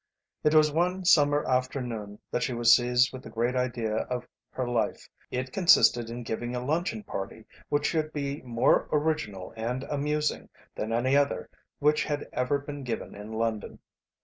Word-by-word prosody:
It 150 +1 +3
was 155 -1 +6
one 180 +4 0
summer 145 -3 +4
afternoon 125 -5 -2
that - - 0
she 130 - -1
was 120 0 +6
seized 125 +1 +2
with 130 - -7
the - - -10
great 120 +2 -1
idea 120 -4 -1
of 125 +2 -3 0.2
her 130 -1 -3
life. 120 -1 -1 0.2
It 130 +1 -4
consisted 120 -10 +5
in 120 +1 -6
giving 120 +2 -3
a 125 0 -3
luncheon 175 +8 -1
party 105 - -6 0.2
which 145 0 +1
should 155 -1 0
be 140 -1 -3
more 120 -2 +2
original 145 -12 -1
and 120 +4 -3
amusing 150 +1 -1 0.2
than 110 - -4
any 125 +4 +2
other 140 0 +1 0.3
which 150 +1 +3
had 145 -1 -3
ever 125 +3 +1
been 145 0 -7
given 115 -3 -4
in 105 +2 -9
London. 110 -1 -2
130 Hz, 170 wpm, -28 LUFS, 120-150 Hz, 0.3 s, was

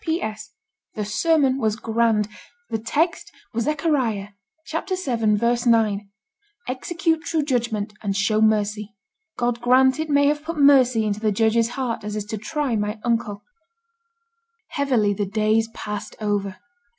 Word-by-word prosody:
'P.S. 220 -11 -3 0.5
The 210 - -2
sermon 275 +4 +2
was 220 -4 +1
grand. 220 -1 +1 0.4
The 225 - -1
text 310 +10 -1 0.2
was 230 0 -1
Zechariah 275 -9 0 0.4
vii. 240 - 0
9, 210 -3 +2 0.6
"Execute 320 +5 -1
true 320 -2 0
judgment 235 -6 -1
and 200 -2 -2
show 215 +1 +2
mercy." 210 -1 +1 0.4
God 240 0 -1
grant 260 +3 +4
it 315 0 -2
may 285 0 +4
have 295 +1 +2
put 330 +1 -5
mercy 260 -6 +5
into 205 0 -1
the 215 -1 +1
judge's 225 +2 +2
heart 250 -5 -2
as 210 0 -4
is 210 -1 -3
to 215 0 -5
try 280 +2 -2
my 210 +1 -2
uncle.' 230 -4 -1 1.3
Heavily 250 -8 +1
the 200 0 -2
days 215 +2 +1
passed 210 -2 -6
over. 200 -3 -2
230 Hz, 140 wpm, -23 LUFS, 210-275 Hz, 1.3 s, mercy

